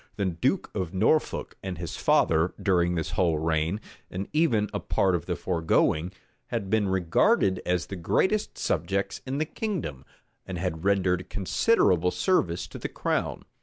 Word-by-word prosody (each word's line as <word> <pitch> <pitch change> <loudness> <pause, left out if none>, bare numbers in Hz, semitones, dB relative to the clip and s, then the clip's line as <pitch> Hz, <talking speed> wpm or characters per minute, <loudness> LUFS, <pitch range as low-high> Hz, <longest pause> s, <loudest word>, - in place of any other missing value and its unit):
The 100 - -1
duke 95 - 0
of 95 -2 -3
Norfolk 115 +11 +1
and 95 -1 -5
his 85 -3 -5
father, 80 +2 +2
during 90 -3 +2
this 80 - -2
whole 85 -4 +2
reign, 80 +4 0 0.3
and 95 +2 -4
even 125 -10 +2
a - - -1
part 95 -1 +1
of 85 -4 -2
the - - -1
foregoing, 80 -1 +1 0.4
had 95 -1 -3
been 110 -2 +2
regarded 95 - +2
as 90 -1 +1
the 100 - -6
greatest 190 - 0
subjects 100 0 -1
in 135 +2 -2
the 155 - 0
kingdom, 155 - -4 0.4
and 95 - -6
had 85 -2 -3
rendered 95 -2 +1
considerable 95 - +2
service 90 - +1
to - - -9
the - - -4
crown. - - -2
95 Hz, 160 wpm, -27 LUFS, 85-105 Hz, 0.4 s, father